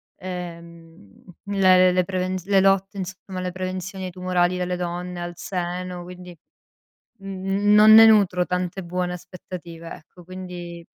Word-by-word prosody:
ehm, 170 - -10 0.2
le 190 -2 +4
le 185 - +5
le 180 0 +2
prevenz 185 -1 -3
le 195 -1 +3
lotte, 195 +1 +2
insomma, 190 0 -6
le 180 0 -3
prevenzioni 185 +1 -5
tumorali 180 0 0
delle 180 0 -2
donne 175 0 -4
al 175 0 -5
seno. 180 0 -4
Quindi, 180 0 -11 0.8
mhmm, 195 +1 0
non 215 +1 +8
ne 225 +1 +10
nutro 195 -5 +4
tante 180 +1 -2
buone 180 +1 -3
aspettative, 175 -2 -9
ecco. 175 +3 -15
Quindi 175 -1 -8
180 Hz, 135 wpm, -23 LUFS, 175-185 Hz, 0.8 s, ne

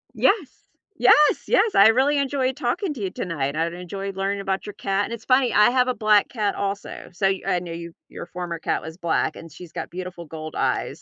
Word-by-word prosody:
Yes, 390 - +1 0.3
yes, 295 +3 +5
yes, 460 -4 +3
I 200 - +7
really 265 +6 +3
enjoyed 265 -2 0
talking 300 +8 -1
to 235 - -8
you 190 - -1
tonight. 150 -6 -3
I've 165 +2 -1
enjoyed 195 +2 -6
learning 200 +1 -1
about 195 -1 -2
your 205 - -7
cat 195 +1 -1
and - - -6
it's 230 -1 -8
funny, 255 -2 +3
I 210 +3 +6
have 255 0 +2
a 255 - 0
black 215 -2 +3
cat 210 -4 -1
also, 200 0 -4
so 195 +2 +1
y 190 0 0
I 180 - +2
know 175 -1 -8
you, 170 0 -7 0.2
your - - -8
former 175 -2 -5
cat - - -1
was 160 +1 -8
black 170 -3 0
and 165 -2 -11
she's 175 +2 -12
got - - -6
beautiful 180 -1 -7
gold 155 0 -8
eyes, - - -1
195 Hz, 225 wpm, -23 LUFS, 175-250 Hz, 0.3 s, I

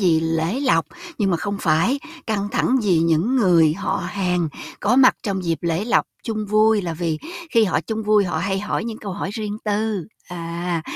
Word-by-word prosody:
vì 165 -5 +3
lễ 165 - -1
lộc, 165 - +2 0.3
nhưng 195 -3 +2
mà 175 - +2
không 200 +4 -3
phải 175 - +2 0.3
căng 205 -3 -1
thẳng 260 - +2
vì 185 -5 +3
những 165 +10 +2
người 170 -9 +4
họ 195 0 -2
hàng 180 -4 0 0.3
có 225 +5 +2
mặt 260 -1 +6
trong 195 -4 -2
dịp 165 -1 0
lễ 170 +3 -1
lộc 240 - +2 0.2
chung 215 -2 -3
vui, 215 0 +3
là 170 -2 -3
vì 160 -1 -2 0.3
khi 230 -1 +4
họ 185 - +1
chung 220 -1 -4
vui 210 -1 +3
họ 175 -3 -2
hay 195 +3 -1
hỏi 210 - -2
những 225 -1 -5
câu 200 -3 -6
hỏi 185 - -4
riêng 210 -1 -4
tư. 210 -3 -1 0.2
À, 170 -1 -3
195 Hz, 205 wpm, -21 LUFS, 170-215 Hz, 0.3 s, mặt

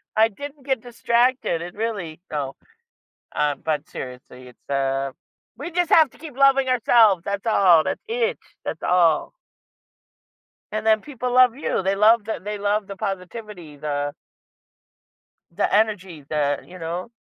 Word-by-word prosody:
I 220 +1 +5
didn't 285 +5 -10
get 265 -5 0
distracted. 240 -4 +1
It 175 +1 -7
really 200 -8 -4
no, 140 -3 -3 0.8
uh, 150 -1 +1
but 155 -2 -1
seriously, 125 0 -9
it's, 125 - -23
uh, 135 0 0 0.5
we 295 +6 -5
just 350 0 0
have 315 -4 +6
to - - -19
keep 295 -4 -10
loving 275 -1 +5
ourselves, 225 -6 +4
that's 200 +2 -3
all. 185 -7 +5
That's - - -3
it. 470 +1 -1 0.3
That's - - -4
all. 170 -3 +3 1.4
And 215 +1 -3
then 220 -1 +4
people 250 -4 -4
love 255 -2 +6
you. 265 -8 -2
They 195 +1 +2
love 215 +2 +5
the 220 - -3
they 210 +1 -4
love 205 0 0
the 195 0 -8
positivity, 195 -4 -6
the 145 0 -3 1.4
the 170 - 0
energy, 195 -7 0
the, 145 -2 0
you 185 - -12
know. 175 +6 -5
205 Hz, 150 wpm, -23 LUFS, 160-240 Hz, 1.4 s, have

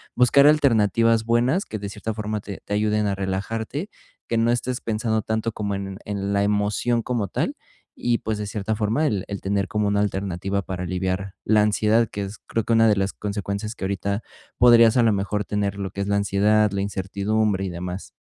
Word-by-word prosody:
buscar 125 +3 +5
alternativas 115 -6 +3
buenas 120 - +2
que 110 - -6
de 100 0 -5
cierta 110 +2 -5
forma 105 0 -3
te 100 -1 -8
te - - -4
ayuden 105 0 +1
a 100 - 0
relajarte, 110 - -3 0.4
que 115 - 0
no 115 +1 +3
estés 120 +1 -2
pensando 110 -1 -1
tanto 110 +1 -1
como 105 -1 -3
en 95 -1 -5
en 100 -1 -3
la 100 0 +2
emoción 105 +3 +1
como 115 -4 -1
tal, - - -2 0.4
y 120 -1 0
pues, 110 -1 -3
de 105 - -3
cierta 105 +1 -2
forma, 115 +8 +1
el 100 -8 -1
el 100 -1 -5
tener 100 0 0
como 105 +1 0
una 100 0 +2
alternativa 100 -1 -2
para 90 -1 -5
aliviar 95 +2 -2
la 105 0 +4
ansiedad, 105 +2 +2
que 100 - -4
es, 100 +2 -8
creo 115 -2 -3
una 115 -1 +5
de 105 -2 +3
las 95 0 0
consecuencias 100 +1 -4
que 95 - -5
ahorita 100 +2 -2 0.4
podrías 115 -2 +7
a - - +5
la 115 - +4
mejor 105 +1 -1
tener 100 -1 -1
lo 95 -1 -3
que 100 - -5
es 100 - -2
la 100 0 +2
ansiedad, 105 +2 +3
la 100 0 -1
incertidumbre 100 +1 -1
y - - -3
demás. 90 +2 -6
105 Hz, 205 wpm, -23 LUFS, 100-110 Hz, 0.4 s, podrías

